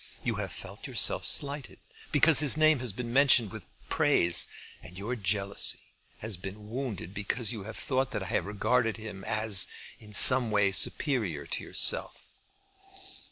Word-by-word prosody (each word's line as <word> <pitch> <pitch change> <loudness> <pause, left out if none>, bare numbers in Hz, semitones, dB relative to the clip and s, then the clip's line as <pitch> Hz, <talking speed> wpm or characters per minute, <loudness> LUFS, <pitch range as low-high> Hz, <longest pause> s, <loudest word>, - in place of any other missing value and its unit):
You - - -4
have - - -6
felt - - -11
yourself - - -2
slighted 140 -1 0 0.3
because 150 0 +4
his 150 -1 +4
name 155 -2 +3
has 125 -3 -2
been 120 +3 -8
mentioned 125 -6 +3
with - - -12 0.2
praise; 85 0 +4 0.3
and 90 +2 -15
your 110 +6 -6
jealousy 100 -2 -1 0.4
has 110 -3 -5
been 105 +3 -11
wounded 115 -8 -7
because 105 +3 -4
you 105 -4 -9
have 110 +1 -10
thought 130 -1 -3
that 105 -3 -6
I 95 - -10
have - - -3
regarded 110 +3 -2
him 105 -3 -11
as 110 -2 0 0.3
in 105 -1 -13
some 130 0 +9
way 100 -2 0
superior 100 - -1
to - - -5
yourself. - - -1
110 Hz, 160 wpm, -27 LUFS, 100-130 Hz, 0.4 s, some